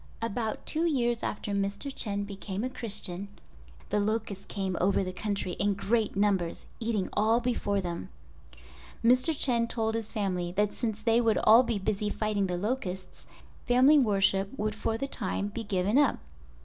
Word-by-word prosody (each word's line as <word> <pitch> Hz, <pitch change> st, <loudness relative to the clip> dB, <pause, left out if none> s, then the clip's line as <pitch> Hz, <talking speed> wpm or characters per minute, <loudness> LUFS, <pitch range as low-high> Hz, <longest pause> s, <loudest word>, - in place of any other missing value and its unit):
About 225 Hz, 0 st, -3 dB
two 325 Hz, +2 st, +1 dB
years 240 Hz, -6 st, +1 dB
after 205 Hz, -, -3 dB
Mr. 200 Hz, +7 st, -2 dB
Chen 205 Hz, -2 st, 0 dB
became 200 Hz, 0 st, -5 dB
a 255 Hz, -, -2 dB
Christian 200 Hz, -6 st, -3 dB, 0.6 s
the 210 Hz, -, +2 dB
locusts 205 Hz, -2 st, -2 dB
came 190 Hz, -3 st, -3 dB
over 195 Hz, +2 st, +2 dB
the 185 Hz, 0 st, -4 dB
country 200 Hz, -1 st, -2 dB
in 200 Hz, 0 st, +2 dB
great 215 Hz, +2 st, 0 dB
numbers, 195 Hz, -4 st, 0 dB
eating 225 Hz, -4 st, -1 dB
all 220 Hz, +3 st, +3 dB
before 230 Hz, -5 st, 0 dB
them. 175 Hz, -2 st, -5 dB, 1.0 s
Mr. 255 Hz, +6 st, +4 dB
Chen 235 Hz, -4 st, +2 dB
told 225 Hz, -1 st, -1 dB
his 225 Hz, -1 st, -3 dB
family 185 Hz, -5 st, -1 dB
that 205 Hz, +2 st, +1 dB
since 220 Hz, -3 st, -3 dB
they 230 Hz, +1 st, +4 dB
would 225 Hz, -2 st, +2 dB
all 225 Hz, +3 st, +8 dB
be 235 Hz, -4 st, -1 dB
busy 205 Hz, +1 st, -1 dB
fighting 210 Hz, -2 st, 0 dB
the 180 Hz, -1 st, -2 dB
locusts, 190 Hz, -3 st, -4 dB, 0.4 s
family 260 Hz, +5 st, +6 dB
worship 195 Hz, -4 st, +2 dB
would 215 Hz, 0 st, -1 dB
for 220 Hz, +1 st, -2 dB
the 275 Hz, -, -3 dB
time 200 Hz, -4 st, -1 dB
be 225 Hz, +2 st, -5 dB
given 200 Hz, +4 st, +1 dB
up. 290 Hz, -, +3 dB
210 Hz, 165 wpm, -29 LUFS, 195-230 Hz, 1.0 s, all